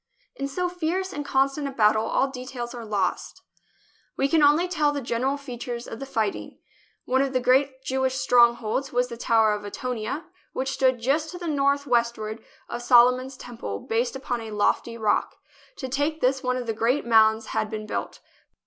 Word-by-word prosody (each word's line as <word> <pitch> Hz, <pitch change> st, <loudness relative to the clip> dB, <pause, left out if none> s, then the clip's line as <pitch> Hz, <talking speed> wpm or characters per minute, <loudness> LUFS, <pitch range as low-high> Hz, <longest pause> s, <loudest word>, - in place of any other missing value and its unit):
In 275 Hz, -, -3 dB
so 360 Hz, +6 st, -2 dB
fierce 355 Hz, +2 st, -2 dB
and 290 Hz, -, -4 dB
constant 275 Hz, +1 st, +1 dB
a -, -, -4 dB
battle 220 Hz, -3 st, +3 dB
all 270 Hz, -, +2 dB
details 255 Hz, -2 st, -6 dB
are 240 Hz, -1 st, -7 dB
lost. 205 Hz, -4 st, -2 dB, 0.7 s
We 275 Hz, -, +2 dB
can 315 Hz, +2 st, +3 dB
only 300 Hz, +5 st, +5 dB
tell 305 Hz, -5 st, +1 dB
the 290 Hz, -, -3 dB
general 260 Hz, +2 st, -1 dB
features 245 Hz, -3 st, -6 dB
of 225 Hz, -, -7 dB
the 275 Hz, -, -6 dB
fighting. 220 Hz, -6 st, -2 dB, 0.5 s
One 260 Hz, +1 st, +2 dB
of 275 Hz, -1 st, -1 dB
the 255 Hz, -, +2 dB
great 260 Hz, +1 st, +2 dB
Jewish 260 Hz, 0 st, 0 dB
strongholds 240 Hz, +1 st, +3 dB
was 245 Hz, 0 st, +1 dB
the 235 Hz, -, -6 dB
Tower 225 Hz, -2 st, +3 dB
of 210 Hz, 0 st, -4 dB
Antonia, 240 Hz, +6 st, -4 dB, 0.3 s
which 265 Hz, +1 st, -2 dB
stood 260 Hz, -2 st, +2 dB
just 295 Hz, +6 st, +1 dB
to 355 Hz, -, -7 dB
the 350 Hz, -, -7 dB
northwestward 240 Hz, -7 st, 0 dB, 0.2 s
of 240 Hz, -, -5 dB
Solomon's 250 Hz, +2 st, +4 dB
Temple, 165 Hz, -, -6 dB
based 235 Hz, +3 st, -1 dB
upon 250 Hz, -3 st, -3 dB
a 225 Hz, -, -7 dB
lofty 215 Hz, +2 st, 0 dB
rock. 215 Hz, -2 st, 0 dB, 0.4 s
To 260 Hz, -, -5 dB
take 290 Hz, +4 st, -1 dB
this, 260 Hz, 0 st, +1 dB
one 250 Hz, -2 st, 0 dB
of 250 Hz, -, -4 dB
the 225 Hz, -, -1 dB
great 235 Hz, +6 st, 0 dB
mounds 220 Hz, -1 st, +4 dB
had 215 Hz, -, 0 dB
been 215 Hz, -1 st, -5 dB
built. 215 Hz, -, -5 dB
255 Hz, 185 wpm, -25 LUFS, 230-275 Hz, 0.7 s, only